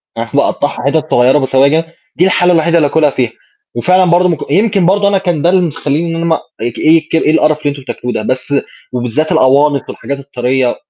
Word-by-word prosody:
فأنا -, -, -4 dB, 0.2 s
اقطّعها -, -, -3 dB
حتت 155 Hz, +1 st, -1 dB
صغيرة 125 Hz, +4 st, +4 dB
بسواجا، 140 Hz, +4 st, +2 dB, 0.3 s
دي 180 Hz, -, +2 dB
الحالة 180 Hz, -1 st, +2 dB
الوحيدة 170 Hz, +1 st, +2 dB
اللي 150 Hz, -3 st, +3 dB
أكلها 150 Hz, 0 st, +2 dB
فيها 125 Hz, -4 st, -2 dB, 0.4 s
وفعلًا 185 Hz, 0 st, +2 dB
برضه 180 Hz, +1 st, +3 dB
م 165 Hz, -, 0 dB
يمكن 195 Hz, +2 st, +1 dB
برضه 200 Hz, +2 st, +2 dB
أنا 200 Hz, -1 st, +2 dB
كان 175 Hz, -6 st, -2 dB
ده 170 Hz, -, +2 dB
المس 175 Hz, -4 st, 0 dB
مخلّيني 165 Hz, +2 st, -2 dB
إن -, -, -3 dB
أنا 165 Hz, 0 st, -3 dB
ما 165 Hz, -1 st, +2 dB, 0.3 s
اك 120 Hz, 0 st, -4 dB
ايك 160 Hz, 0 st, +2 dB
إيه 155 Hz, -1 st, +2 dB
القرف 155 Hz, -1 st, +2 dB
اللي 145 Hz, -, 0 dB
أنتم 140 Hz, -1 st, -6 dB
بتاكلوه 125 Hz, -1 st, -5 dB
ده، -, -, -2 dB
بس 130 Hz, +4 st, -3 dB, 0.4 s
وبالذات 125 Hz, +6 st, -2 dB
الأوانص 140 Hz, +2 st, +3 dB
والحاجات 140 Hz, 0 st, -6 dB
الطارية 130 Hz, -2 st, -1 dB
155 Hz, 205 wpm, -13 LUFS, 135-170 Hz, 0.4 s, صغيرة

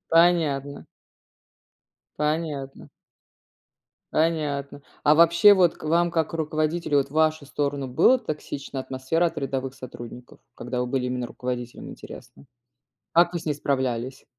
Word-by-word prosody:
Понятно. 160 Hz, -5 st, +2 dB, 1.3 s
Понятно. 150 Hz, -3 st, -3 dB, 1.2 s
Понятно. 150 Hz, -3 st, -1 dB, 0.2 s
А 150 Hz, +1 st, +6 dB
вообще, 170 Hz, +5 st, +7 dB
вот 180 Hz, -3 st, +3 dB
к -, -, -18 dB
вам 170 Hz, +2 st, +2 dB
как 160 Hz, -2 st, 0 dB
к -, -, -8 dB
руководителю- 155 Hz, -1 st, 0 dB
вот 135 Hz, -, 0 dB
в -, -, -27 dB
вашу 155 Hz, -1 st, +2 dB
сторону 140 Hz, -1 st, -2 dB
было 245 Hz, -, +4 dB
токсична 145 Hz, -, -5 dB
атмосфера 130 Hz, +7 st, 0 dB
от 165 Hz, -, -4 dB
рядовых 135 Hz, -1 st, -3 dB
сотрудников? 120 Hz, -1 st, -10 dB, 0.2 s
Когда 125 Hz, +1 st, -4 dB
вы 125 Hz, -, -1 dB
были 125 Hz, 0 st, -1 dB
именно 125 Hz, -1 st, -2 dB
руководителем, 125 Hz, -1 st, -6 dB
интересно? 70 Hz, -, -12 dB, 0.7 s
Как 175 Hz, +1 st, +4 dB
вы 175 Hz, -, -2 dB
с 165 Hz, -, -11 dB
ней 150 Hz, -, +1 dB
справлялись? 130 Hz, -3 st, -2 dB
145 Hz, 135 wpm, -25 LUFS, 130-165 Hz, 1.3 s, вообще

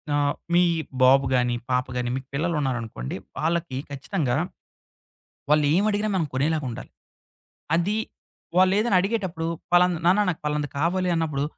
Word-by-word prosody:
ఆహ్, 145 Hz, 0 st, +2 dB, 0.2 s
మీ 175 Hz, -, +6 dB, 0.4 s
బాబు 135 Hz, +2 st, +6 dB
గాని, 125 Hz, -1 st, +2 dB, 0.2 s
పాప 125 Hz, 0 st, +2 dB
గాని 125 Hz, -1 st, -1 dB
మీకు 130 Hz, 0 st, -6 dB
పిల్లలుంన్నారనుకోండి, 135 Hz, -, -2 dB, 0.2 s
వాళ్ళకి 160 Hz, -2 st, -1 dB
ఖచ్చితంగా, 140 Hz, -1 st, -2 dB, 1.1 s
వాళ్ళేం 150 Hz, +6 st, +3 dB
అడిగినా 210 Hz, +1 st, 0 dB
మనం 180 Hz, -4 st, +1 dB
కొనేలాగుండాలి. 135 Hz, -2 st, -2 dB, 0.8 s
అది 180 Hz, +5 st, +1 dB, 0.6 s
వాళ్ళేదైనా 195 Hz, +3 st, +4 dB
అడిగేటప్పుడు 190 Hz, -5 st, -2 dB, 0.2 s
ఫలాన 175 Hz, 0 st, +4 dB
"నాన్న 190 Hz, +4 st, +5 dB
నాకు 170 Hz, -, -3 dB
పాలనది 150 Hz, -1 st, -1 dB
కావాలి" 180 Hz, +4 st, +1 dB
అన్నప్పుడు, 155 Hz, -4 st, -1 dB
155 Hz, 120 wpm, -24 LUFS, 135-180 Hz, 1.1 s, మీ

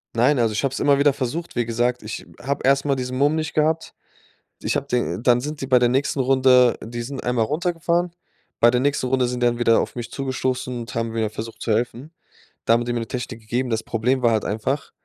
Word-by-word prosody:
Nein, 125 Hz, +4 st, +3 dB
also 115 Hz, -2 st, +2 dB
ich 105 Hz, -, -1 dB
habe 135 Hz, -, +1 dB
es 135 Hz, -, -4 dB
immer 140 Hz, -1 st, +4 dB
wieder 140 Hz, 0 st, +4 dB
versucht. 150 Hz, +7 st, -4 dB
Wie 120 Hz, -, +1 dB
gesagt, 120 Hz, +2 st, 0 dB
ich 105 Hz, -, -6 dB, 0.2 s
habe 140 Hz, +2 st, -2 dB
erstmal 135 Hz, +1 st, +3 dB
diesen 130 Hz, 0 st, -4 dB
Mumm 145 Hz, +3 st, +3 dB
nicht 155 Hz, -1 st, -3 dB
gehabt. 155 Hz, +1 st, 0 dB, 0.7 s
Ich -, -, -1 dB
habe 140 Hz, -, -2 dB
den 125 Hz, -2 st, -1 dB
dann 125 Hz, -1 st, +4 dB
sind 150 Hz, +1 st, -5 dB
die 135 Hz, -, -3 dB
bei 125 Hz, -2 st, +5 dB
der 120 Hz, -, +3 dB
nächsten 135 Hz, +2 st, 0 dB
Runde 130 Hz, -2 st, +4 dB
die 120 Hz, +1 st, -5 dB
sind 130 Hz, +3 st, -6 dB
einmal 120 Hz, -2 st, +1 dB
runtergefahren. 170 Hz, +4 st, 0 dB, 0.5 s
Bei 120 Hz, -, +6 dB
der 125 Hz, -, +2 dB
nächsten 140 Hz, -2 st, 0 dB
Runde 130 Hz, -1 st, +1 dB
sind 125 Hz, 0 st, -3 dB
die -, -, +5 dB
dann 120 Hz, 0 st, -1 dB
wieder 115 Hz, -1 st, +4 dB
auf -, -, -5 dB
mich 120 Hz, -2 st, -5 dB
zugestoßen 130 Hz, -2 st, -2 dB
und 115 Hz, +2 st, -8 dB
haben 115 Hz, -1 st, -2 dB
wieder 110 Hz, -2 st, 0 dB
versucht 110 Hz, +1 st, -8 dB
zu 115 Hz, -, -1 dB
helfen. 120 Hz, +7 st, -1 dB, 0.5 s
Da 115 Hz, -, +4 dB
haben 120 Hz, +1 st, +2 dB
die 120 Hz, -, -2 dB
mir 120 Hz, -, -1 dB
'ne 115 Hz, -, -5 dB
Technik 120 Hz, -2 st, -5 dB
gegeben. 120 Hz, +4 st, -2 dB
Das 110 Hz, -1 st, -1 dB
Problem 125 Hz, +3 st, 0 dB
war 120 Hz, -2 st, +3 dB
halt 110 Hz, -, 0 dB
einfach, 120 Hz, +7 st, -2 dB
125 Hz, 240 wpm, -22 LUFS, 120-140 Hz, 0.7 s, Bei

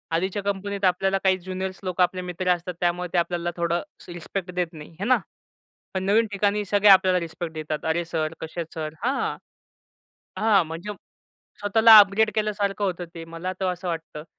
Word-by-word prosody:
आधीच्या 190 Hz, +4 st, -1 dB
कंपनीत 200 Hz, 0 st, -2 dB
आपल्याला 195 Hz, +2 st, +2 dB
काही 190 Hz, -1 st, +3 dB
ज्युनियर्स 185 Hz, +1 st, -5 dB
लोकं 185 Hz, -1 st, +1 dB
आपले 185 Hz, +1 st, -1 dB
मित्र 180 Hz, 0 st, -3 dB
असतात 175 Hz, +1 st, -7 dB
त्यामुळे 175 Hz, 0 st, 0 dB
ते -, -, +1 dB
आपल्याला 175 Hz, 0 st, 0 dB
थोडं 170 Hz, 0 st, 0 dB
अशी 175 Hz, -, -12 dB
रिस्पेक्ट 180 Hz, +2 st, -5 dB
देत 180 Hz, -2 st, 0 dB
नाही, 155 Hz, +1 st, -11 dB
हे 200 Hz, -, -2 dB
ना? 255 Hz, +2 st, +4 dB, 0.8 s
पण 190 Hz, -, -1 dB
नवीन 220 Hz, +3 st, +3 dB
ठिकाणी 205 Hz, +1 st, +1 dB
सगळे 205 Hz, +1 st, +3 dB
आपल्याला 185 Hz, -1 st, +6 dB
रिस्पेक्ट 165 Hz, 0 st, -6 dB
देतात. 155 Hz, -1 st, -4 dB
"अरे 165 Hz, +2 st, 0 dB
सर, 160 Hz, -1 st, -2 dB
कसे 160 Hz, +2 st, -5 dB
आहेत 165 Hz, -, -7 dB
सर?" 155 Hz, -1 st, -5 dB
हां, 260 Hz, +3 st, 0 dB, 1.0 s
हां. 210 Hz, -4 st, +4 dB
म्हणजे 165 Hz, +6 st, -6 dB, 0.7 s
स्वतःला 220 Hz, +2 st, +8 dB
अपग्रेड 210 Hz, +2 st, +5 dB
केल्यासारखं 205 Hz, -1 st, -1 dB
होतं 180 Hz, -2 st, -2 dB
ते. 165 Hz, -1 st, -7 dB
मला 165 Hz, +3 st, -5 dB
तर 190 Hz, -, 0 dB
असं 180 Hz, +1 st, -6 dB
वाटतं 160 Hz, -2 st, -5 dB
185 Hz, 180 wpm, -24 LUFS, 170-200 Hz, 1.0 s, स्वतःला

